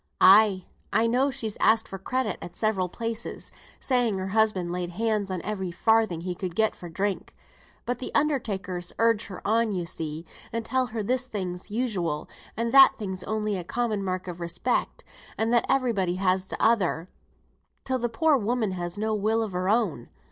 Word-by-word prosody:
"Ay, 195 -1 +6 0.3
I 225 - +3
know 250 +4 +2
she's 225 -5 -3
asked 220 0 +3
for 195 - -7
credit 255 +6 -2
at 175 - -9
several 200 -5 0
places, 230 +3 -4 0.3
saying 245 -6 +1
her 190 0 -3
husband 205 -4 +1
laid 180 0 -2
hands 210 +1 -1
on 185 -3 -3
every 190 -3 -3
farthing 215 -1 +2
he 180 +1 -3
could 175 -1 -5
get 220 +1 +2
for 175 - -9
drink. 195 +4 -3 0.5
But 245 0 -2
th' 255 - -4
undertakers 195 - -1
urge 230 -2 +2
her 190 -1 -7
on 225 +1 +2
you 180 -3 -2
see, 160 -1 -5 0.3
and 230 0 -3
tell 260 +1 +1
her 220 -2 -4
this 255 +4 0
thing's 185 -6 -5
usual, 195 -10 -2 0.3
and 230 +1 -1
that 270 +1 +8
thing's 190 -4 -4
only 215 -2 -1
a 180 - -4
common 215 +1 -1
mark 185 -1 -3
of 175 -1 -6
respect, 170 +8 -2 0.3
and 225 +2 +1
that 240 - +3
every 255 -3 +2
body 185 -3 0
has 185 0 +1
t'other 195 -8 +1
thing, - - -31 0.7
till 260 -1 0
the 240 0 -1
poor 295 +6 +3
woman 225 -1 0
has 175 0 -4
no 220 +1 0
will 215 +2 +1
o' 220 - -3
her 185 0 -2
own. 205 - 0
210 Hz, 185 wpm, -26 LUFS, 185-230 Hz, 0.7 s, that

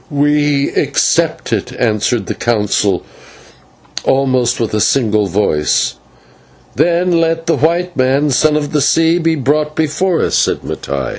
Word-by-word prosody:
"We 145 -1 +1
accept - - 0
it," - - -3
answered 110 -1 0
the - - -3
Council 105 -4 0 1.0
almost 130 -2 +1
with 115 -3 -2
one 105 -1 +1
voice. 90 -6 0 0.8
"Then 175 +1 +1
let 165 0 -1
the 165 - +1
white 170 +3 0
man, 135 +3 +1
Son 150 +4 +2
of 150 -1 -2
the 150 - +1
Sea, 165 +4 +2
be 165 -1 +1
brought 150 +2 -1
before 160 +3 0
us," - - -1
said - - +1
Mattai. 70 -2 -4
140 Hz, 135 wpm, -14 LUFS, 115-160 Hz, 1.0 s, Son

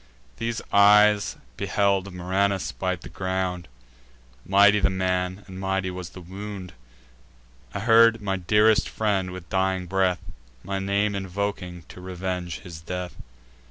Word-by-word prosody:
These 115 0 -3
eyes 105 0 +6 0.2
beheld 100 -1 +1
Murranus 95 -3 0
bite 85 +9 -3
the - - -9
ground: 95 -1 -3 0.8
Mighty 100 +2 +6
the 100 - +3
man, 95 +1 -1
and 95 -1 -9
mighty 95 -1 -1
was 90 -1 -6
the 90 - -11
wound. 95 0 -8 1.0
I 100 - -2
heard 115 0 +6
my 100 -2 -2
dearest 105 +3 +3
friend, 100 -4 0
with 90 -1 -8
dying 95 -1 0
breath, 95 0 +1 0.4
My 100 0 -3
name 100 +1 0
invoking 95 -2 -4
to 90 - -11
revenge 90 -2 -4
his 85 -3 -10
death. 90 +2 -5
95 Hz, 130 wpm, -25 LUFS, 90-100 Hz, 1.0 s, eyes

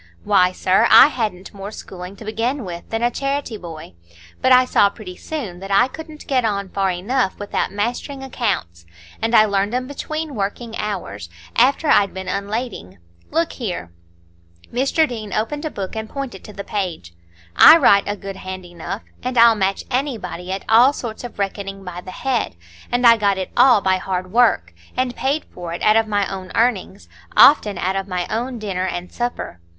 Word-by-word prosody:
Why, 185 -3 +4
sir, 190 +5 +2
I - - +9
hadn't 210 -9 -4
more 200 0 -7
schooling 185 -3 -9
to 215 - -12
begin 230 +4 -2
with 175 -1 -8
than 225 +1 -2
a 240 - +2
charity 275 -2 -2
boy; 165 - -9 0.5
but 260 - +3
I 255 0 +7
saw 205 -5 +4
pretty 200 -3 -10
soon 215 - -6
that 195 +1 -8
I 200 +5 +4
couldn't 310 +2 -10
get 260 -3 +1
on 200 -3 -1
far 195 0 0
enough 190 +5 -1
without 205 0 -2
mastering 240 +7 -3
accounts, 190 - -3 0.3
and 225 +1 +1
I 215 - +7
learned 200 +2 0
'em 255 0 -1
between 310 +2 -5
working 225 +2 -4
hours, 105 - -5 0.3
after 270 +6 +3
I'd 200 -8 +3
been 190 0 -6
unlading. 200 - -4 0.3
Look 330 0 0
here." 180 - -5 0.8
Mr 275 +6 +2
Deane 215 -6 -6
opened 290 +8 -2
a - - -1
book 195 -5 -6
and 220 0 -5
pointed 270 -9 -6
to 210 - -10
the 200 - -6
page. 180 - -4 0.4
"I 320 - +10
write 200 -10 +5
a 205 - -1
good 195 0 -7
hand 185 -1 -7
enough, 175 +4 -7 0.2
and 255 0 -3
I'll 230 0 +8
match 195 -2 -1
anybody 240 -9 -3
at 190 0 -4
all 240 +5 +6
sorts 235 -5 -6
of 245 - -8
reckoning 195 0 -4
by 180 -1 -7
the 185 - -11
head; 245 - -2 0.4
and 245 0 +1
I 230 -1 +8
got 200 -2 +1
it 190 - -4
all 245 -4 +6
by 190 -1 +2
hard 185 -1 -4
work, 215 - +3 0.2
and 255 -1 0
paid 280 +4 -1
for 175 -2 -6
it 170 - -6
out 215 - +5
of 225 0 +3
my 205 -1 +1
own 190 -1 -7
earnings,—often 210 0 +3
out 190 +2 -1
of 195 0 -2
my 180 -2 -2
own 245 +3 -2
dinner 190 -4 -3
and 175 -1 -5
supper. 240 - -4
210 Hz, 185 wpm, -20 LUFS, 190-245 Hz, 0.8 s, I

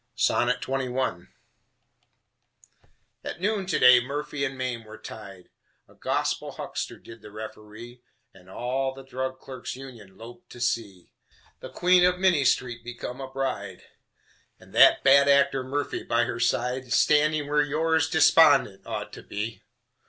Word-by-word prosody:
XXI 125 -6 -1 2.0
At - - -6
noon 200 0 -1
to - - 0
day 125 0 +7
Murphy 140 +2 -4
and 135 -1 -3
Mame 125 -3 -4
were 110 0 -12
tied. 100 -5 -11 0.4
A - - -21
gospel - - -2
huckster - - -6
did 115 0 -14
the 105 - -12
referee, 110 +3 -10 0.3
And 90 0 -19
all 130 +5 -3
the 135 - -11
Drug 130 0 -5
Clerks' 130 -2 -8
Union 120 -8 -12
loped 120 +2 -13
to 120 - -12
see 105 -6 -3 0.5
The - - -9
queen 180 0 +3
of 180 0 +3
Minnie 180 -7 +2
Street 120 -2 0
become 120 +2 -7
a 135 - -7
bride, 135 0 -4 0.8
And - - -18
that - - +6
bad 140 +1 +6
actor, 140 -1 +3
Murphy, 140 +3 -3
by - - +1
her - - -4
side, 125 +1 -1
Standing 150 +3 +3
where 150 +1 +2
Yours 160 +2 +1
Despondent 160 -12 +4
ought 105 -2 -5
to - - -9
be. 105 0 -6
130 Hz, 145 wpm, -26 LUFS, 115-140 Hz, 2.0 s, day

